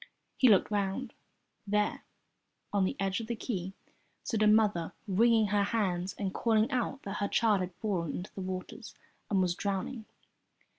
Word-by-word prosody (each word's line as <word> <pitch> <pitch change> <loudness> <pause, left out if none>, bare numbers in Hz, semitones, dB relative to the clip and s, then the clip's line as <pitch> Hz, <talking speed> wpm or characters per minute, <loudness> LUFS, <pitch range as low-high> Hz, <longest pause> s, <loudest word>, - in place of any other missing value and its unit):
He 260 - +5
looked 205 0 +4
round. 205 +5 -1 0.5
There, 210 +1 0 0.7
on 200 -2 +3
the - - -1
edge 195 0 0
of 225 - -6
the 235 - -2
quay, 190 -5 -4 0.5
stood 220 -3 -1
a 215 - +5
mother 210 -6 +3
wringing 220 +2 +4
her 205 0 +2
hands 190 -4 -1
and 195 -2 -2
calling 225 +2 +2
out 255 +2 -1
that 200 0 -4
her 200 - 0
child 210 -2 +2
had 180 -1 -4
fallen 180 -7 -2
into 180 - -7
the 195 - -6
water 185 0 -5 0.5
and 195 -2 +2
was 180 -1 +1
drowning. 200 +5 -3
200 Hz, 165 wpm, -31 LUFS, 190-220 Hz, 0.7 s, He